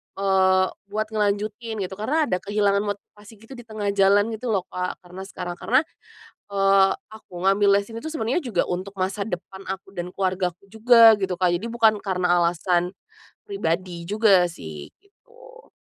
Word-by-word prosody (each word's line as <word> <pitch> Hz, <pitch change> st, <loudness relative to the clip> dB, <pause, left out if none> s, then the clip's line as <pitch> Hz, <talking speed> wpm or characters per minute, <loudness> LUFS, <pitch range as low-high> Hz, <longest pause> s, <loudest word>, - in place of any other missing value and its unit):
eee, 190 Hz, -1 st, +3 dB, 0.2 s
buat 215 Hz, +2 st, -2 dB
ngelanjutin, 215 Hz, +2 st, -2 dB
gitu. 185 Hz, -, -6 dB
Karena 295 Hz, +9 st, +1 dB
ada 185 Hz, -11 st, -1 dB
kehilangan 205 Hz, 0 st, +1 dB, 0.2 s
motivasi 210 Hz, +2 st, -18 dB
gitu 225 Hz, +4 st, -19 dB
di 245 Hz, -3 st, -10 dB
tengah 210 Hz, -2 st, -2 dB
jalan 200 Hz, +2 st, +3 dB
gitu 225 Hz, +3 st, -5 dB
loh 190 Hz, -3 st, 0 dB
Kak, 180 Hz, 0 st, -3 dB
karena 185 Hz, +2 st, -9 dB
sekarang 175 Hz, -2 st, -7 dB
karena, 255 Hz, +5 st, +2 dB, 0.6 s
eee, 195 Hz, -1 st, +3 dB, 0.2 s
aku 185 Hz, -5 st, -10 dB
ngambil 200 Hz, +1 st, +4 dB
les 200 Hz, +2 st, -1 dB
ini 225 Hz, -, -6 dB
tuh 310 Hz, -, -7 dB
sebenarnya 280 Hz, -3 st, -1 dB
juga 240 Hz, -, -1 dB
untuk 190 Hz, +3 st, -4 dB
masa 195 Hz, +2 st, -2 dB
depan 190 Hz, 0 st, -7 dB
aku 190 Hz, 0 st, -6 dB
dan 180 Hz, -1 st, -7 dB
keluargaku 185 Hz, -2 st, -2 dB
juga, 230 Hz, +1 st, +7 dB
gitu 190 Hz, -2 st, -1 dB
Kak, 180 Hz, 0 st, +1 dB
jadi 225 Hz, -, -5 dB
bukan 225 Hz, -2 st, +2 dB
karena 180 Hz, -3 st, +1 dB
alasan, 175 Hz, +2 st, 0 dB, 0.5 s
pribadi 180 Hz, -, -3 dB
juga 200 Hz, 0 st, +4 dB
sih, 80 Hz, -, -9 dB
gitu. 475 Hz, +4 st, -19 dB
200 Hz, 165 wpm, -23 LUFS, 185-220 Hz, 0.6 s, juga